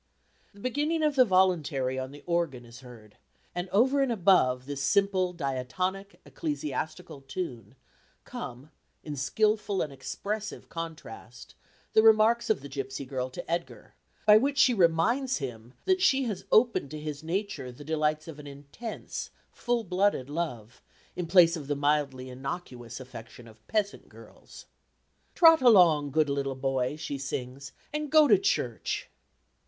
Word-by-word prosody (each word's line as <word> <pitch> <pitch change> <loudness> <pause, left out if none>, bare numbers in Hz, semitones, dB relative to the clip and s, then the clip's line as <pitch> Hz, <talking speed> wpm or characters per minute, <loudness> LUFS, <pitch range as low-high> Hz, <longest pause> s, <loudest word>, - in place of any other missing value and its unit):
The - - -15
beginning 295 +8 -1
of 300 -2 +2
the 255 -2 +6
voluntary 160 - +1
on 130 0 -4
the 145 +1 -13
organ 170 -8 -1
is 115 0 -13
heard, 115 -5 -14 0.4
and 175 +1 -4
over 260 +9 +3
and 270 -3 +1
above 175 - +3
this 140 0 -5
simple 190 +2 +2
diatonic, 180 +7 -3
ecclesiastical 150 -1 -5
tune, 130 - -6 0.5
come, 125 +5 -8 0.3
in 150 -2 -5
skilful 210 - 0
and 145 - -2
expressive 210 +10 -5
contrast, 165 - -8 0.4
the 220 - +6
remarks 225 +1 +4
of 220 - +1
the 140 - -8
gipsy 135 0 -5
girl 130 -1 -3
to 175 +7 -8
Edgar, 170 +1 -4 0.3
by 210 0 +8
which 280 +3 -1
she 265 -3 +5
reminds 220 +9 +2
him 120 -3 -7
that 375 -1 +2
she 275 -8 +4
has 215 -7 -4
opened 225 - +3
to 155 - -7
his 150 -1 -6
nature 165 -6 -3
the 125 +4 -12
delights 155 0 0
of 155 -2 -9
an 145 - -10
intense 145 +11 -7 0.2
full 240 -1 -1
blooded 185 -7 0
love 125 -9 -5 0.3
in 180 -2 -3
place 170 -1 +6
of 150 -4 -7
the 145 - -1
mildly 140 -3 0
inocuous 130 -3 -7
affection 120 -2 -11
of 110 -1 -18
peasant 210 -2 -2
girls. - - -15 0.7
"Trot 325 -3 +7
along, 175 - +6
good 155 +2 +2
little 140 -1 -2
boy," 130 0 -1
she 150 -3 -5
sings, 130 0 -5 0.2
"and 300 -1 -3
go 310 -1 +7
to 380 - +6
church." 395 - -1
155 Hz, 150 wpm, -28 LUFS, 135-210 Hz, 0.7 s, by